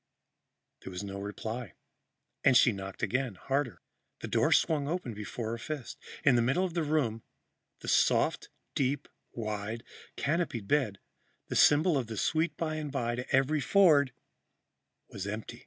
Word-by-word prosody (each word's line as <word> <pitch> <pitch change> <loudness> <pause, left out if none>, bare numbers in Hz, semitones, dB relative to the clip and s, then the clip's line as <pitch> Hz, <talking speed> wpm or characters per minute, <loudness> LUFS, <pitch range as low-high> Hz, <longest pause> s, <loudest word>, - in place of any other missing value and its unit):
There - - -9
was 90 +1 -5
no 100 -1 -5
reply 110 +1 -5 0.7
and 130 -3 +6
she 120 - +6
knocked 95 -2 -7
again, 125 -4 0
harder. 135 +4 -2 0.4
The - - -4
door - - +2
swung 150 -3 +3
open 160 -7 -3
before 110 +2 -5
her 115 - -4
fist. 145 0 -6 0.2
In 140 - +6
the 120 - +4
middle 135 +11 +2
of 180 - -4
the 170 - 0
room, 145 -8 0 0.6
the - - -9
soft, - - +2 0.2
deep, 140 +1 0 0.3
wide, 110 0 -4 0.3
canopied 145 - -1
bed, 120 -7 +1 0.5
the - - -3
symbol 150 +1 +5
of 120 - -4
the 110 -1 -6
sweet 160 +8 0
by 155 -1 -2
and 150 -2 -4
by 120 -4 -1
to 125 +1 -5
every 135 +3 +3
Ford, 150 -3 +5 1.0
was 100 0 -6
empty. 105 +2 -5
125 Hz, 155 wpm, -30 LUFS, 110-150 Hz, 1.0 s, and